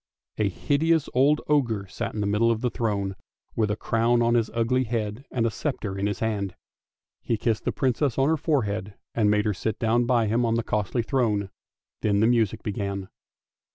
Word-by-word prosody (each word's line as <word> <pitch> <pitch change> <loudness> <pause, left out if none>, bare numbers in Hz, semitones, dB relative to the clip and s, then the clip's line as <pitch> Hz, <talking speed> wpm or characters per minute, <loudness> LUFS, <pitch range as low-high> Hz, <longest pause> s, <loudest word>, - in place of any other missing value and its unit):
A 105 -2 +2
hideous 155 - +1
old 145 +4 +4
ogre 120 -9 +1
sat 115 +4 -5
in 105 - -2
the - - 0
middle 105 +3 +2
of 115 -1 0
the 125 - 0
throne 100 -4 -1 0.4
with 110 -2 +1
a 105 - 0
crown 115 +2 +1
on 120 0 +3
his 115 -2 +2
ugly 125 +3 +1
head 110 +2 -3
and 115 -3 0
a 115 - +1
sceptre 110 -5 -3
in 100 +1 -1
his 105 - -3
hand. 100 -4 -1 0.7
He 115 - -1
kissed 110 0 -1
the - - +1
Princess 130 0 0
on 135 +1 +3
her 160 - +3
forehead, 110 - -1 0.2
and 105 -3 +2
made 105 0 +2
her 105 - +1
sit 110 +3 -3
down 120 +2 +2
by 120 -3 +3
him 115 +3 +1
on 115 -1 +1
the 115 - 0
costlv 105 +3 -1
throne, 105 -8 0 0.5
then 100 -1 +2
the 110 - +4
music 115 -2 +2
began! 100 -2 -3
115 Hz, 200 wpm, -25 LUFS, 105-120 Hz, 0.7 s, old